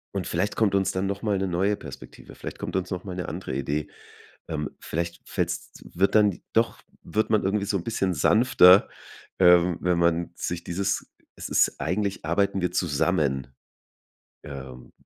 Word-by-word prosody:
Und 95 -3 -2
vielleicht 95 +4 -1
kommt 105 -3 +2
uns 95 -1 +1
dann 95 +1 -1
noch 100 0 -3
mal 105 -3 +1
'ne 95 - -1
neue 95 +3 +1
Perspektive, 70 -9 -11
vielleicht - - -7
kommt - - -3
uns 90 -1 -3
noch 90 -1 -4
mal 95 -3 -6
'ne 90 - -4
andere 85 -2 -5
Idee. 70 +3 -2 0.6
Ähm, 75 -3 -3
vielleicht 85 +1 -4
fällt's - - -3
wird 95 +3 0
dann 105 -4 +4
doch 115 +1 +1 0.2
wird 110 +1 -1
man 110 -2 +2
irgendwie 100 +1 0
so 100 - -1
'n 85 - -6
bisschen 95 -5 -1
sanfter, 95 - +6 0.5
ähm, 90 -1 +5
wenn 90 -1 +1
man 85 0 +1
sich 85 0 -4
dieses 95 +3 -2 0.2
es - - -7
ist - - +2
eigentlich 100 +2 -2
arbeiten 95 +4 0
wir 90 - 0
zusammen, 75 -6 0 0.9
ähm, 65 -3 -9
90 Hz, 170 wpm, -25 LUFS, 85-100 Hz, 0.9 s, sanfter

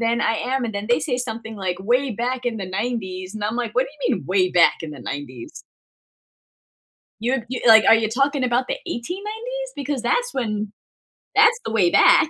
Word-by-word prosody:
than 235 0 +1
I 225 - +1
am, 255 +2 -1
and 220 -3 -4
then 200 +1 -3
they 240 - +4
say 250 -5 -2
something, 225 -2 -5
like, 185 -2 -3
"Way 245 +7 +1
back 245 +3 -3
in 235 - -1
the 195 - -4 0.2
90s." 190 -5 -4
And 210 -1 -4
I'm 215 - -1
like, 235 -3 -3
"What 255 - +3
do - - -12
you 280 - +1
mean - - -8
way 185 0 +2
back 175 -1 +5
in 160 -2 -6
the 140 - -10
90s?" 130 -4 -8 1.6
You'd 240 +1 0
you 255 0 -4
like, 220 -1 +8
"Are - - +9
you 225 -1 +1
talking 275 +3 +1
about 245 +1 +1
the - - -1
1890s? 430 - -5
Because 280 -3 -3
that's - - 0
when 215 -4 -2 0.6
that's 465 +2 +6
the - - -4
way 185 -6 +3
back." 305 - +6
235 Hz, 205 wpm, -22 LUFS, 210-265 Hz, 1.6 s, Are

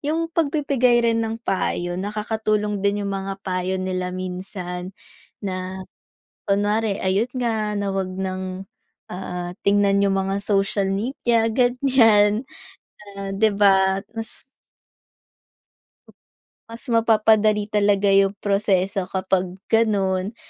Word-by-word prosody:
Yung 325 +3 -2
pagbibigay 280 -6 +2
rin 230 0 +2
ng 225 0 -2
payo, 175 -1 -1
nakakatulong 210 0 -1
din 200 0 0
yung 200 - -3
mga 195 0 -4
payo 185 0 -1
nila 185 -1 -2
minsan, 185 0 -6 0.5
na 185 0 -4 0.6
kunware 205 +1 +1
ayun 195 +6 +1
nga, 220 -4 -1
na 200 -1 -2
'wag 190 -1 -2
ng, 185 0 -4 0.5
ah, 180 -1 -5
tingnan 200 0 +3
yung 195 -1 +1
mga 195 +1 -1
social 195 -1 +1
media 230 +1 0
ganyan, 245 -3 +3 0.7
ah, 195 0 -5
'di 220 +2 +3
ba? 195 -1 +4
Mas 225 0 -6 2.3
Mas 230 +1 -9
mapapadali 215 -2 +3
talaga 205 -1 +3
yung 195 0 +4
proseso 195 -2 +1
kapag 190 -1 -1 0.2
ganon. 200 -2 +1
200 Hz, 110 wpm, -22 LUFS, 190-220 Hz, 2.3 s, ba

